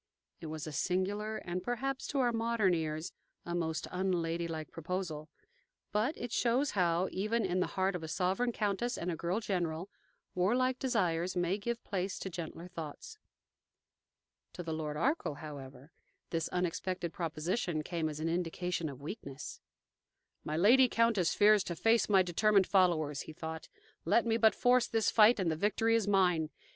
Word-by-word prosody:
'" - - -45
It 165 - -6
was 155 +1 -5
a 155 - -5
singular, 200 +7 -1
and 180 +1 -4
perhaps, 260 +6 -2
to 285 - -3
our 245 -1 +3
modern 225 -4 +2
ears, 155 -1 -2 0.3
a 175 - -4
most 160 -2 -1
unladylike 170 -3 -2
proposal; 165 -2 -4 0.6
but 225 +9 0
it 240 -1 -5
shows 250 +5 +2
how, 180 -2 +2
even 215 +3 0
in 185 0 0
the 180 - +1
heart 190 0 +2
of 180 - -4
a 160 - -5
sovereign 190 +9 0
countess 220 +3 -1
and 175 +1 -2
a - - -2
girl 175 +6 -1
general, 180 -3 -2 0.4
warlike 250 +8 +1
desires 185 -9 0
may 180 +3 0
give 235 +3 -3
place 190 -1 -2
to 190 - -5
gentler 170 0 -6
thoughts. 175 - -8 1.3
To 175 - -6
the 165 -1 -3
Lord 155 -1 -3
Arkell, 270 - 0
however, 140 -1 -10 0.4
this 165 -1 -1
unexpected 180 0 -2
proposition 165 0 -2
came 165 -1 -2
as 150 0 -6
an 160 - -1
indication 170 0 -1
of 140 0 -10
weakness. 145 -5 -7 0.8
"My 155 +1 -2
lady 245 +8 +6
countess 230 -8 +2
fears 210 -1 +5
to 170 - -3
face 225 +6 +3
my 190 -2 +5
determined 195 +3 +3
followers," 165 -7 +2
he 155 - -9
thought. 160 0 -7 0.3
"Let 230 +9 +3
me 225 -1 +2
but 220 -2 +4
force 245 0 +3
this 225 -2 +1
fight 220 +1 +6
and 175 -4 +1
the - - 0
victory 210 +6 +1
is 225 -3 +1
mine. 180 -6 +3
180 Hz, 170 wpm, -32 LUFS, 165-215 Hz, 1.3 s, lady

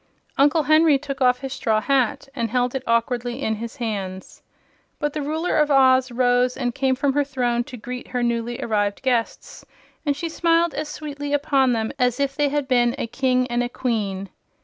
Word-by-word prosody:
Uncle 295 +3 +3
Henry 310 0 +5
took 275 0 -6
off 250 -1 +3
his 270 -1 -5
straw 220 -1 +1
hat 275 +4 0
and 235 -3 -1
held 245 +1 0
it 265 - -2
awkwardly 240 +1 0
in 220 -6 -1
his 230 +3 -7
hands. 200 -7 -5 0.6
But 295 0 -2
the 305 - -3
Ruler 315 +4 -1
of 300 -1 +3
Oz 260 -2 +4
rose 245 0 +2
and 245 -2 -1
came 265 0 +1
from 275 +1 0
her 290 +1 +2
throne 245 -4 -1
to 250 - -9
greet 250 +3 -7
her 250 -1 -2
newly 235 0 -1
arrived 205 -1 -1
guests, 245 -3 -2 0.4
and 285 -2 0
she 335 - -3
smiled 335 0 +2
as 300 0 -4
sweetly 290 -1 -5
upon 280 -3 +2
them 220 -1 -1
as 250 +1 +1
if 275 -1 0
they 290 0 +1
had 290 -1 -1
been 240 -2 +2
a - - -2
king 255 +1 +1
and 245 0 -1
queen. 200 -6 -2
255 Hz, 195 wpm, -22 LUFS, 240-285 Hz, 0.6 s, Henry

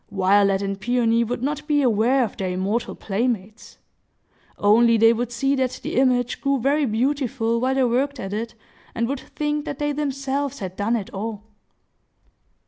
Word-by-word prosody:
Violet 195 0 +3
and 195 0 -3
Peony 235 0 +2
would 240 +1 -4
not 295 +2 -3
be 295 -2 +2
aware 245 +3 +3
of 220 - -4
their 190 -1 -3
immortal 195 +6 -2
playmates,—only 220 +1 -1
they 225 +1 +6
would 240 +1 -3
see 270 +4 0
that 260 -2 -1
the - - -4
image 250 -2 +2
grew 275 -1 +1
very 285 +4 +2
beautiful 240 -1 0
while 260 +1 +1
they 270 - +2
worked 260 +3 0
at 195 -2 -5
it, 230 +2 -4 0.4
and 235 0 0
would 275 +1 -3
think 295 +1 -3
that 285 - -5
they 295 0 -1
themselves 275 -1 -2
had 185 -5 -6
done 210 +4 0
it 210 -5 -4
all. 210 +1 -5
240 Hz, 165 wpm, -23 LUFS, 215-275 Hz, 0.4 s, they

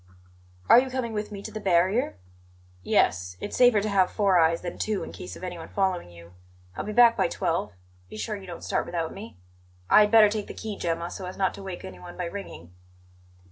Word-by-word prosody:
"Are - - +9
you 260 +1 -1
coming 255 -3 -3
with 210 0 -4
me 200 -1 -7
to 220 - -7
the 215 - -5
barrier?" 190 - +1 0.6
"Yes; 90 0 +1
it's - - -5
safer 245 -4 +5
to 215 - -2
have 190 -2 +3
four 195 -4 +3
eyes 165 0 +3
than 175 - -6
two 215 -2 -1
in - - -7
case 90 +1 -8
of - - -12
anyone 175 -3 -6
following 190 - -1
you. 85 0 -15 0.4
I'll - - -4
be 215 - -5
back 235 +1 +6
by - - +2
twelve. 165 -10 -2 0.4
Be 110 - -9
sure 210 - -3
you 195 -2 -10
don't 175 -2 -8
start - - -1
without 165 -2 -3
me. 205 - -10 0.5
I - - +8
had 210 - +4
better 220 -2 +8
take 210 -1 -3
the - - -8
key, 215 -2 -5
Gemma, 170 -1 -3
so 185 - -6
as 185 - -8
not 190 -1 +1
to - - -10
wake 190 -2 -7
anyone 90 -1 -10
by 180 - -3
ringing." 170 - -8
190 Hz, 220 wpm, -26 LUFS, 165-210 Hz, 0.6 s, Are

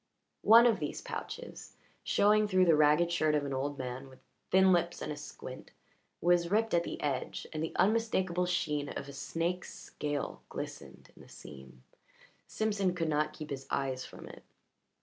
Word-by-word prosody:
One 230 +2 +8
of 225 -5 +3
these 150 -2 -3
pouches, - - -7 0.3
showing 210 +1 +3
through 185 -2 +4
the 165 -3 +5
ragged 150 +3 +4
shirt 155 -3 +2
of 145 -1 0
an 140 - -3
old 140 +2 -2
man 130 +1 -6
with 130 - -16 0.3
thin 190 0 +5
lips 175 0 0
and - - -4
a - - -3
squint, 145 -3 -9 0.5
was 175 0 +3
ripped 220 +3 +1
at 170 0 +3
the - - -6
edge, 140 -3 -2
and 155 - -3
the 160 - -4
unmistakable 190 -4 +1
sheen 155 -5 -1
of - - -6
a 140 - -9
snake's 170 +5 -3
scale 145 -1 -5
glistened - - -8
in - - -15
the - - -16
seam. 65 -3 -13 0.6
Simpson 200 -4 0
could 165 -2 -1
not 150 0 +1
keep 155 -2 -8
his 135 -1 -5
eyes 130 -2 -1
from - - -11
it. - - -12
165 Hz, 175 wpm, -31 LUFS, 145-185 Hz, 0.6 s, One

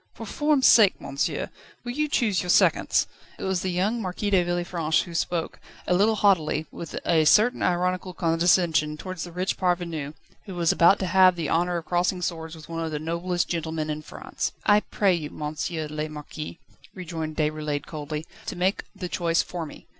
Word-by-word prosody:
"For 225 - -7
form's 295 +4 +1
sake, 210 -5 +6
monsieur, 140 +1 -2 0.3
will 240 - -4
you 300 +4 0
choose 220 -10 +1
your 180 - -6
seconds?" - - +3 0.3
It - - -8
was 190 -2 0
the 190 - -2
young 195 +6 0
Marquis 200 +2 -3
de 185 -3 +4
Villefranche 175 -2 0
who 175 - -10
spoke, 170 0 -2 0.3
a - - +1
little 210 +5 +3
haughtily, 170 -7 +2
with 170 - -8
a 165 -2 +3
certain 220 +9 +4
ironical 180 +1 0
condescension 165 -2 +2
towards 185 +1 -6
the 175 - -10
rich 180 +3 -2
parvenu, 170 -5 -1 0.3
who 190 - -7
was 170 -2 +2
about 170 +4 +5
to - - 0
have 185 0 +5
the 165 -4 -3
honour 175 +1 +1
of 165 - -6
crossing 180 +1 0
swords 165 -2 -4
with 155 -1 -12
one 165 0 -4
of 160 - -2
the 155 - -3
noblest 170 +3 -2
gentlemen 160 -2 -2
in 150 0 -4
France. - - -5
"I 205 - +6
pray 200 -2 +1
you, 155 -4 -3
Monsieur 155 +2 -4
le 150 +1 -4
Marquis," 150 +1 -8 0.4
rejoined 160 -4 -5
Déroulède 150 -1 -1
coldly, 150 0 -5 0.2
"to - - -3
make 185 +3 0
the 190 -2 -5
choice 170 -1 +1
for 170 -3 -5
me. - - -13
175 Hz, 190 wpm, -25 LUFS, 160-185 Hz, 0.4 s, sake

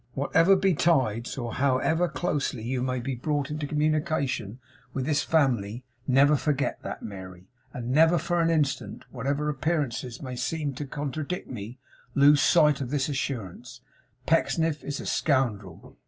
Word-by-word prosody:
Whatever 165 +7 +4
betides, 150 - +1
or 120 -3 -4
however 140 +6 +2
closely 145 -8 -2
you 125 +2 -2
may 130 0 -1
be 130 +2 -3
brought 145 +3 -2
into 150 -1 -3
communication 150 - -1 0.4
with 130 -2 -1
this 145 -1 +1
family, 125 -7 +1 0.2
never 140 +3 +5
forget 145 -1 -1
that, - - -6
Mary; 95 -2 -9 0.2
and 120 0 -5
never 160 +5 +5
for 170 +2 0
an 165 - +2
instant, 150 -4 -1
whatever 140 +4 -2
appearances 145 -5 -2
may 130 -2 -6
seem 145 +3 -2
to 140 +2 -6
contradict 145 +5 -4
me, 115 +1 -7 0.4
lose 145 +1 +6
sight 150 -4 +4
of 130 - -3
this 145 0 0
assurance 125 -3 -5 0.4
Pecksniff 160 -1 +1
is 145 -1 -4
a - - -7
scoundrel. 110 - -1
140 Hz, 145 wpm, -27 LUFS, 125-155 Hz, 0.4 s, lose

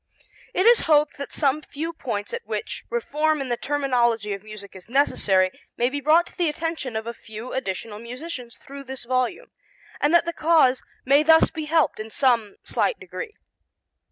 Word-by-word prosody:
It 370 - +2
is 475 0 +7
hoped 300 -2 +3
that 280 - -5
some 290 0 +1
few 320 +3 -5
points 225 - -4
at 475 -1 -4
which - - -4
reform 310 -9 0
in 270 -2 -4
the 240 - +1
terminology 240 -7 0
of 200 - -6
music 215 -2 -11
is 190 +3 -12
necessary 195 -8 +2 0.3
may 245 +2 +1
be 285 +1 -3
brought 315 +5 +5
to - - -16
the 345 -3 +3
attention 305 -5 -3
of 220 0 -2
a 235 - -4
few 220 +2 -9
additional 210 -3 -4
musicians 250 +1 -7
thru 280 0 -10
this 265 -1 -7
volume, 255 - -1 0.5
and 295 - +2
that 340 -1 +5
the 340 - -2
cause 305 -7 +4 0.2
may 280 +3 +5
thus 320 +1 +5
be 315 -1 -5
helped 320 -4 +2
in 215 +1 -6
some 230 -4 +1
slight - - 0
degree. 440 -3 -7
275 Hz, 185 wpm, -24 LUFS, 235-315 Hz, 0.5 s, is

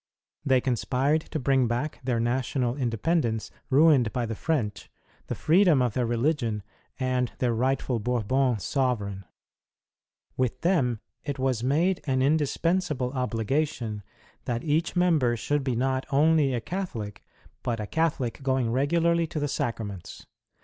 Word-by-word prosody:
'J'hey 130 -2 +4
conspired 135 +4 +1
to 155 - -5
bring 135 -3 +2
back 120 +6 -2
their 125 -2 0
national 125 +1 0
independence 120 - 0 0.2
ruined 140 -5 +5
by 125 -2 -1
the 115 - -3
French, 110 -5 -2 0.4
the - - -3
freedom 170 -2 +4
of 125 -4 +1
their 125 0 0
reli 120 +7 +2
gion, 115 -8 -3 0.4
and 130 -2 0
their 125 -3 +1
rightful 125 0 0
Bourbon 125 +2 +1
sovereign. 105 -5 -1 1.1
With 130 -3 -1
them 135 - +1 0.2
it 145 -2 -4
was 130 -3 0
made 165 +8 +2
an 130 -1 +2
indispensable 150 -1 +1
obligation 125 -2 -1 0.4
that 120 -1 -2
each 160 +2 0
member 155 -10 +3
should 145 +6 -1
be 130 -3 -1
not 130 +2 0
only 145 -1 +3
a 120 - -2
Catholic, 115 - -5 0.4
but 115 -2 -2
a 105 - -3
Catholic 145 -3 -1
going 130 -3 0
regularly 165 +6 +2
to 155 - -4
the 145 - 0
Sacra 120 -5 -2
ments. 100 -4 -9
130 Hz, 145 wpm, -27 LUFS, 120-150 Hz, 1.1 s, ruined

